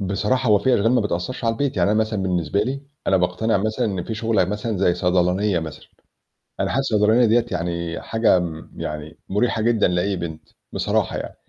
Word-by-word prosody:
بصراحة 105 +6 0
هو 105 -1 +5
في 130 +2 +2
أشغال 115 +4 +2
ما 125 - +4
بتأثّرش 105 +5 -3
على 115 - +2
البيت، 135 -1 -2
يعني 90 +3 +2
أنا 110 - +2
مثلًا 110 -3 0
بالنسبة 90 +1 0
لي 135 +4 -3 0.3
أنا 95 - +4
باقتنع 100 +5 +1
مثلًا 110 +3 -1
إن 95 -4 -3
في 110 - -4
شغلة 110 -3 +1
مثلًا 105 +2 -3
زي 90 -2 +3
صيدلانية 90 +2 +1
مثلًا، 80 -2 -8 0.7
أنا - - 0
حاسس 135 -2 -1
الصيدلانية 110 +3 +4
ديَّة 115 +1 +3
يعني 85 -1 -3
حاجة 110 -4 +2
م 80 -2 -6
يعني 75 +1 -6
مريحة 110 +3 +1
جدًا 115 0 +3
لأي 90 +3 0
بنت، 85 -3 -7 0.2
بصراحة - - 0
يعني، - - -6
100 Hz, 195 wpm, -22 LUFS, 90-115 Hz, 0.7 s, هو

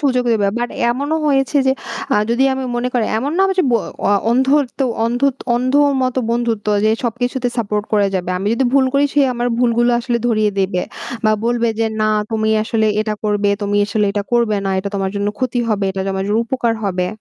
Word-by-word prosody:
সুযোগ 255 -4 +1
দিবে। 210 -3 +1
বাট 240 0 -1 0.2
এমনও 285 +6 -1
হয়েছে 270 0 +1
যে 265 - +4 0.4
আ - - +3
যদি 240 +3 +2
আমি 265 0 -4
মনে 245 +1 -1
করি 245 -3 +1
এমন 275 +6 -2
না 385 - +5 0.2
যে 365 - +5
ব - - 0 0.3
অয়া 205 0 +3
অন্ধত্ব 265 +2 +1 0.2
অন্ধত 245 +3 +1 0.2
অন্ধর 270 +4 +3
মতো 255 0 0
বন্ধুত্ব 235 -3 -1 0.2
যে 215 - +4
সবকিছুতে 245 +1 -1
সাপোর্ট 210 -2 -1
করা 205 -1 +3
যাবে। 180 -1 -2
আমি 195 - -4
যদি 265 - 0
ভুল 275 -1 +5
করি 280 +1 +4
সে 290 - +4
আমার 240 +1 -1
ভুলগুলো 240 0 +2
আসলে 240 -1 -1
ধরিয়ে 215 -3 +2
দেবে 185 -2 0 0.4
বা 215 - +4
বলবে 235 0 +1
যে, 225 - +2
"না 215 - +2 0.2
তুমি 220 -1 0
আসলে 220 0 0
এটা 215 0 -1
করবে 205 -1 +1
তুমি 205 0 0
আসলে 210 +1 0
এটা 205 - -1
করবে 235 -3 +2
না। 195 - 0
এটা 195 +1 -3
তোমার 195 -1 -1
জন্য 200 0 0
ক্ষতি 250 -1 -1
হবে, 205 -2 0
এটা 190 0 -3
তোমার 190 0 -2
জন্য 210 +2 +1
উপকার 235 -1 0
হবে।" 180 -2 -1
235 Hz, 205 wpm, -18 LUFS, 210-255 Hz, 0.4 s, না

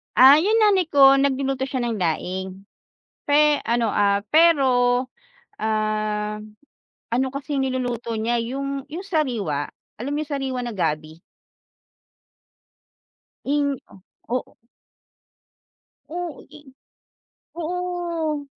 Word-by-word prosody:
Ah, 265 +3 +9
yung 440 +3 +3
nanay 400 -5 +4
ko 275 -1 +7
nagluluto 270 -1 0
siya 265 -1 -3
ng 230 - -2
laing 185 +2 -3 0.6
pe 295 0 +3
ano, 235 -1 +1
ah, 200 -1 +2
pero, 320 0 +5 0.9
ah, 215 -1 -1 0.7
ano 260 +3 +1
kasi 280 +1 -5
niluluto 245 -3 -2
niya, 235 +2 0
yung 275 +3 -4
yung 365 +5 -6
sariwa, 230 - -1 0.3
alam 270 +5 -3
yung 300 0 -3
sariwa 270 -3 -2
na 235 - -4
gabi? 155 -1 -3 2.2
Ing, 285 -1 0 0.5
o 245 - -1
oo. - - -9 1.5
Oh, 345 -1 -5
eh. 300 0 -14 0.9
Oo, 340 -3 -3
270 Hz, 100 wpm, -23 LUFS, 215-300 Hz, 2.2 s, Ah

